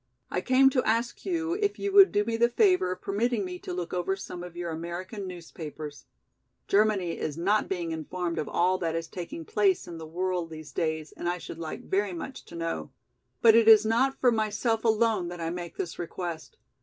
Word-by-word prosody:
I -, -, 0 dB
came 265 Hz, +1 st, +5 dB
to 255 Hz, -, +2 dB
ask 230 Hz, -, -1 dB
you 335 Hz, -2 st, 0 dB
if 410 Hz, +1 st, 0 dB
you 400 Hz, -, -2 dB
would 395 Hz, 0 st, +8 dB
do 205 Hz, -, +2 dB
me 230 Hz, 0 st, -1 dB
the 235 Hz, +1 st, +3 dB
favor 365 Hz, -, +3 dB
of 185 Hz, -, -6 dB
permitting 215 Hz, +1 st, 0 dB
me 180 Hz, -1 st, -6 dB
to -, -, -7 dB
look 175 Hz, -1 st, -4 dB
over 180 Hz, +2 st, 0 dB
some 180 Hz, -2 st, -7 dB
of 175 Hz, -1 st, -9 dB
your 175 Hz, -1 st, -3 dB
American 175 Hz, +5 st, -5 dB
newspapers. 155 Hz, -4 st, -8 dB, 0.6 s
Germany 200 Hz, -4 st, +2 dB
is 155 Hz, -1 st, -3 dB
not 200 Hz, +5 st, +1 dB
being 175 Hz, -3 st, -2 dB
informed 170 Hz, +2 st, -3 dB
of -, -, -3 dB
all 185 Hz, +2 st, +2 dB
that 165 Hz, -2 st, -1 dB
is 165 Hz, 0 st, -3 dB
taking 170 Hz, -2 st, -7 dB
place 200 Hz, 0 st, +2 dB
in 170 Hz, -1 st, -7 dB
the 160 Hz, -, -8 dB
world 180 Hz, 0 st, -2 dB
these 155 Hz, -1 st, -9 dB
days 155 Hz, -2 st, -2 dB
and 175 Hz, -, -3 dB
I 175 Hz, -, -1 dB
should 170 Hz, -, -9 dB
like 160 Hz, -2 st, -6 dB
very 195 Hz, 0 st, 0 dB
much 215 Hz, +10 st, -7 dB
to -, -, -11 dB
know. 165 Hz, 0 st, -3 dB, 0.5 s
But 225 Hz, -1 st, +8 dB
it 230 Hz, 0 st, +5 dB
is 220 Hz, -1 st, +8 dB
not 250 Hz, +5 st, +2 dB
for 250 Hz, -, +4 dB
myself 220 Hz, +1 st, 0 dB
alone 220 Hz, -4 st, +2 dB
that 175 Hz, 0 st, -7 dB
I 165 Hz, 0 st, -2 dB
make 175 Hz, -1 st, -6 dB
this 170 Hz, -, -4 dB
request. 170 Hz, -2 st, -5 dB
185 Hz, 210 wpm, -28 LUFS, 170-225 Hz, 0.6 s, would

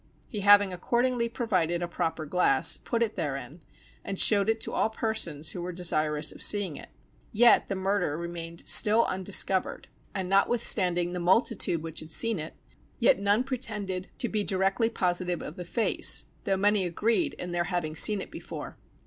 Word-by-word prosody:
He 215 Hz, -, -7 dB
having 205 Hz, -1 st, +5 dB
accordingly 235 Hz, +5 st, -1 dB
provided 185 Hz, -8 st, -2 dB
a -, -, -3 dB
proper 165 Hz, -2 st, -4 dB
glass, 150 Hz, -4 st, +2 dB
put 235 Hz, -1 st, -2 dB
it 220 Hz, -, -4 dB
therein, 150 Hz, 0 st, -6 dB, 0.4 s
and 195 Hz, -, -5 dB
showed 205 Hz, +1 st, +3 dB
it 225 Hz, 0 st, 0 dB
to -, -, -3 dB
all -, -, 0 dB
persons 220 Hz, -9 st, -1 dB
who 180 Hz, -, -7 dB
were 180 Hz, +1 st, -5 dB
desirous 155 Hz, -4 st, 0 dB
of -, -, -13 dB
seeing 200 Hz, -7 st, +3 dB
it. -, -, -12 dB, 0.4 s
Yet 235 Hz, +2 st, +4 dB
the 195 Hz, -, -3 dB
murder 190 Hz, -5 st, -2 dB
remained 170 Hz, -1 st, -8 dB
still 225 Hz, +1 st, +5 dB
undiscovered; 190 Hz, 0 st, -1 dB, 0.3 s
and 190 Hz, -2 st, -3 dB
notwithstanding 185 Hz, -3 st, +2 dB
the 180 Hz, -, -4 dB
multitude 180 Hz, -2 st, +1 dB
which 165 Hz, -1 st, -4 dB
had 155 Hz, -, -8 dB
seen 225 Hz, +3 st, +2 dB
it, 155 Hz, +1 st, -8 dB, 0.4 s
yet 235 Hz, -5 st, +3 dB
none 205 Hz, +4 st, +1 dB
pretended 210 Hz, -8 st, -3 dB
to 245 Hz, -, -2 dB
be 215 Hz, -2 st, -2 dB
directly 195 Hz, +4 st, 0 dB
positive 180 Hz, -4 st, -2 dB
of 150 Hz, -, -8 dB
the 180 Hz, -, -8 dB
face, 225 Hz, +6 st, +3 dB, 0.2 s
though 195 Hz, -1 st, 0 dB
many 205 Hz, 0 st, +1 dB
agreed 225 Hz, -, -1 dB
in 180 Hz, -, -7 dB
their 175 Hz, 0 st, -1 dB
having 175 Hz, -4 st, -3 dB
seen 205 Hz, +5 st, +5 dB
it -, -, -10 dB
before. -, -, -9 dB
190 Hz, 175 wpm, -27 LUFS, 175-220 Hz, 0.4 s, having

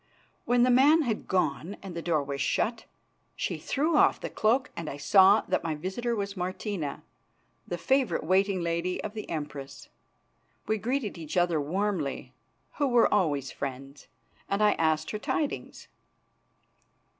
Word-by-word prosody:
When 245 Hz, 0 st, +3 dB
the 250 Hz, -, +4 dB
man 290 Hz, +6 st, +5 dB
had 225 Hz, -5 st, -3 dB
gone 180 Hz, +1 st, -1 dB
and 190 Hz, -3 st, -7 dB
the 170 Hz, -, -3 dB
door 160 Hz, -4 st, +1 dB
was 140 Hz, 0 st, -4 dB
shut, 225 Hz, +10 st, 0 dB, 0.5 s
she -, -, -3 dB
threw 300 Hz, +4 st, 0 dB
off -, -, +4 dB
the -, -, -6 dB
cloak 250 Hz, +6 st, +1 dB
and 165 Hz, -2 st, -5 dB
I 140 Hz, -, -6 dB
saw 195 Hz, +7 st, +6 dB
that 185 Hz, -, -1 dB
my 160 Hz, -2 st, -2 dB
visitor 195 Hz, +9 st, -3 dB
was 200 Hz, -1 st, -3 dB
Martina, 185 Hz, -3 st, -4 dB, 0.6 s
the 175 Hz, -, -3 dB
favourite 265 Hz, +7 st, +1 dB
waiting 190 Hz, +2 st, +2 dB
lady 170 Hz, +2 st, -1 dB
of 215 Hz, -, -5 dB
the 215 Hz, -1 st, -7 dB
Empress. 145 Hz, -3 st, -6 dB, 0.8 s
We 220 Hz, 0 st, 0 dB
greeted 235 Hz, -5 st, -2 dB
each 160 Hz, +1 st, -5 dB
other 175 Hz, -3 st, +2 dB
warmly, 175 Hz, -2 st, -2 dB, 0.4 s
who 290 Hz, -, +2 dB
were 240 Hz, -3 st, +4 dB
always 145 Hz, -9 st, +1 dB
friends, 135 Hz, +1 st, -7 dB, 0.4 s
and 200 Hz, +2 st, +1 dB
I 210 Hz, -, +6 dB
asked 160 Hz, -2 st, 0 dB
her 215 Hz, -, -4 dB
tidings. 290 Hz, +6 st, -3 dB
190 Hz, 155 wpm, -28 LUFS, 155-220 Hz, 0.8 s, saw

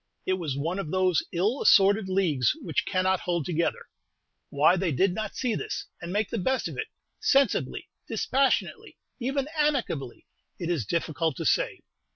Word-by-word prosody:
It 185 Hz, -, +1 dB
was 150 Hz, -6 st, -3 dB
one 165 Hz, +7 st, -2 dB
of 165 Hz, -, -4 dB
those 185 Hz, -1 st, +2 dB
ill 205 Hz, +10 st, 0 dB
assorted 200 Hz, 0 st, +5 dB
leagues 175 Hz, -9 st, +2 dB
which 235 Hz, -, -1 dB
cannot 185 Hz, -1 st, +1 dB
hold 170 Hz, -4 st, -2 dB
together. 170 Hz, -1 st, -1 dB, 0.6 s
Why 150 Hz, +5 st, +4 dB
they 185 Hz, -2 st, 0 dB
did 180 Hz, +7 st, +2 dB
not 215 Hz, +2 st, -4 dB
see 250 Hz, -3 st, -1 dB
this, -, -, -4 dB, 0.2 s
and 170 Hz, 0 st, -5 dB
make 205 Hz, +2 st, -1 dB
the 230 Hz, -, -1 dB
best 260 Hz, +8 st, 0 dB
of -, -, -7 dB
it, 440 Hz, -, -3 dB, 0.3 s
sensibly, 275 Hz, -, +1 dB, 0.2 s
dispassionately, 260 Hz, +4 st, 0 dB, 0.2 s
even 270 Hz, +2 st, -1 dB
amicably, 260 Hz, -, -1 dB, 0.3 s
it 175 Hz, -1 st, -3 dB
is 140 Hz, -, -1 dB
difficult 160 Hz, -1 st, -1 dB
to -, -, -4 dB
say. -, -, +1 dB
185 Hz, 165 wpm, -27 LUFS, 165-230 Hz, 0.6 s, assorted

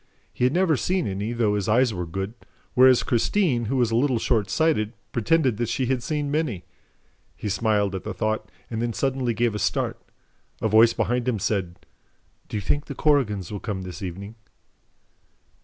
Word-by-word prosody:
He 125 Hz, -, +1 dB
had 130 Hz, -, +3 dB
never 175 Hz, -3 st, +3 dB
seen 180 Hz, +5 st, 0 dB
any, 100 Hz, +3 st, -3 dB
though 115 Hz, -3 st, +1 dB
his 105 Hz, 0 st, -1 dB
eyes 120 Hz, +1 st, +3 dB
were 90 Hz, -2 st, -4 dB
good, 95 Hz, +5 st, -4 dB, 0.4 s
whereas 130 Hz, 0 st, +6 dB
Christine, 125 Hz, -, +1 dB
who 125 Hz, +5 st, -1 dB
was 120 Hz, -3 st, +2 dB
a -, -, +1 dB
little 130 Hz, +1 st, +2 dB
shortsighted, 110 Hz, +2 st, +1 dB, 0.2 s
pretended 130 Hz, -1 st, +2 dB
that 120 Hz, 0 st, -1 dB
she 130 Hz, -, 0 dB
had 130 Hz, 0 st, 0 dB
seen 145 Hz, +2 st, -2 dB
many. 140 Hz, -, -1 dB, 0.7 s
He 105 Hz, -, -4 dB
smiled 105 Hz, -1 st, +1 dB
at 95 Hz, -, -4 dB
the -, -, -4 dB
thought 110 Hz, 0 st, -2 dB, 0.2 s
and 115 Hz, 0 st, -2 dB
then 120 Hz, -1 st, -1 dB
suddenly 130 Hz, -3 st, -1 dB
gave 120 Hz, -1 st, +1 dB
a 105 Hz, -, -3 dB
start. -, -, -1 dB, 0.6 s
A -, -, 0 dB
voice 110 Hz, +2 st, +6 dB
behind 125 Hz, 0 st, -1 dB
him 125 Hz, -3 st, +1 dB
said: 95 Hz, -4 st, -2 dB, 0.6 s
"Do -, -, -3 dB
you -, -, -2 dB
think 145 Hz, +9 st, 0 dB
the 140 Hz, -, -7 dB
Korrigans 115 Hz, -, +1 dB
will 105 Hz, -, -4 dB
come 95 Hz, -3 st, -4 dB
this 90 Hz, -4 st, -8 dB
evening?" 100 Hz, +3 st, -6 dB
115 Hz, 185 wpm, -24 LUFS, 105-130 Hz, 0.7 s, whereas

